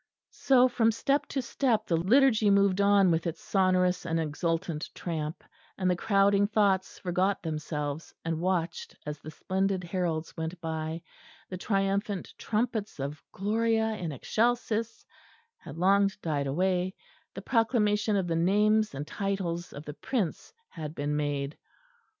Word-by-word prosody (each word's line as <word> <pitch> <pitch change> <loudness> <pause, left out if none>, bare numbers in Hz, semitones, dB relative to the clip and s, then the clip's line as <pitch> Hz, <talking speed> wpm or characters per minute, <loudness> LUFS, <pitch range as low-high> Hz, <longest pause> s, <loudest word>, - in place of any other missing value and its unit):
_" - - -49 0.3
So 255 -2 +4
from 230 -2 +2
step 275 +6 0
to 270 - -2
step 240 -2 0
the 170 - +1
liturgy 220 +4 +4
moved 200 -1 +4
on 200 -2 +5
with 165 +1 0
its 165 0 -4
sonorous 185 -2 +2
and 165 -1 -1
exultant 165 +1 -2
tramp, 155 -3 -4 0.3
and 185 - 0
the - - +2
crowding 200 +1 +3
thoughts 200 -3 +1
forgot 185 +2 0
themselves, 150 -1 -4
and 165 0 -1
watched 175 -2 -2
as 150 -1 -5
the 155 - -9
splendid 190 +3 -1
heralds 170 -3 -2
went 165 +2 -4
by; 160 0 -4 0.5
the 185 - -3
triumphant 195 0 -1
trumpets 220 - -2
of 140 +3 -4
Gloria 225 +2 +1
in 175 -6 -4
excelsis 230 - -1 0.5
had - - -10
long 195 +3 +4
died 145 -4 -1
away; 180 +5 0 0.4
the - - -7
proclamation 220 -3 +2
of 195 -2 +1
the 165 -1 -1
names 210 +3 +3
and 145 +2 -4
titles 175 -1 -3
of 145 +2 -9
the 150 - -6
Prince 200 - -3 0.2
had 155 -2 -7
been 145 +1 -1
made. 145 -1 -2
185 Hz, 145 wpm, -29 LUFS, 165-210 Hz, 0.5 s, on